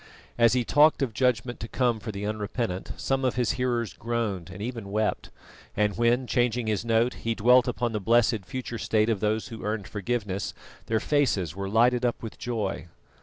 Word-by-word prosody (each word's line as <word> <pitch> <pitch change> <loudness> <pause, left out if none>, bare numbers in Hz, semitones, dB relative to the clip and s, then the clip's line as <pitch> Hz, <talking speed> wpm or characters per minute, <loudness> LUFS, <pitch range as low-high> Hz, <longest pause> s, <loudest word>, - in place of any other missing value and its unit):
As 115 -1 +4
he 125 -2 +1
talked 150 +2 +4
of 120 -5 -2
judgment 120 0 0
to 110 - -5
come 120 -2 0
for 110 +1 -5
the 100 0 -5
unrepentant, 105 -2 -3
some 135 0 -1
of 130 -3 +1
his 125 -2 +1
hearers 120 -3 -1
groaned 110 -7 -3
and 95 +2 -9
even 115 -2 -5
wept; 105 +1 -1 0.5
and 105 -1 +2
when, 120 +2 +2
changing 120 -1 +1
his 110 -1 -1
note, 115 +1 +2
he 115 0 -1
dwelt 125 +3 +5
upon 120 -1 -1
the 110 - -2
blessed 110 0 +3
future 120 +3 -5
state 110 0 +1
of 110 -4 +1
those 110 +4 -1
who 115 -2 -8
earned 105 -2 -2
forgiveness, 105 -2 -3 0.3
their 110 -1 +1
faces 110 - +1
were 100 0 -4
lighted 120 +3 +3
up 120 -1 -1
with 110 - -7
joy. 105 -7 -3
115 Hz, 190 wpm, -27 LUFS, 105-120 Hz, 0.5 s, dwelt